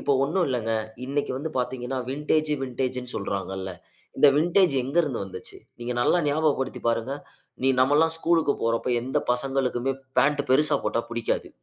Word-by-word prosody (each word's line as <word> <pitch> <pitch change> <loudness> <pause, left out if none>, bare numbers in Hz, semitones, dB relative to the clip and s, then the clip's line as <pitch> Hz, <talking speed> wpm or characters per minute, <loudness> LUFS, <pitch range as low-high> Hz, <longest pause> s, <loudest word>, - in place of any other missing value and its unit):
இப்போ 140 - +1
ஒண்ணும் 175 +5 +1
இல்லங்க, 115 -3 -1 0.3
இன்னைக்கு 140 +1 -1
வந்து 155 +4 -4
பார்த்தீங்கன்னா, 125 +1 -2
வின்டேஜ் 150 +2 0
வின்டேஜ்ன்னு 125 -1 -3
சொல்றாங்கள்ல. 95 -2 -3 0.4
இந்த 145 - +7
வின்டேஜ் 175 0 +3
எங்க 135 +6 -5
இருந்து 140 -7 -2
வந்துச்சு. 95 - -9 0.2
நீங்க 120 +1 -3
நல்லா 175 - +3
ஞாபகப்படுத்தி 145 -2 0
பாருங்க. 115 +3 0 0.5
நீ 135 - +3
நம்மல்லாம் 150 +5 +4
ஸ்கூல்‌க்கு 165 -3 +2
போற 115 - +2
அப்ப - - -2
எந்த 130 +2 0
பசங்களுக்குமே 135 0 0 0.3
பேண்ட் 145 +1 +3
பெருசா 150 +3 +5
போட்டா 115 - +1
புடிக்காது. 120 -1 -2
135 Hz, 150 wpm, -25 LUFS, 125-150 Hz, 0.5 s, இந்த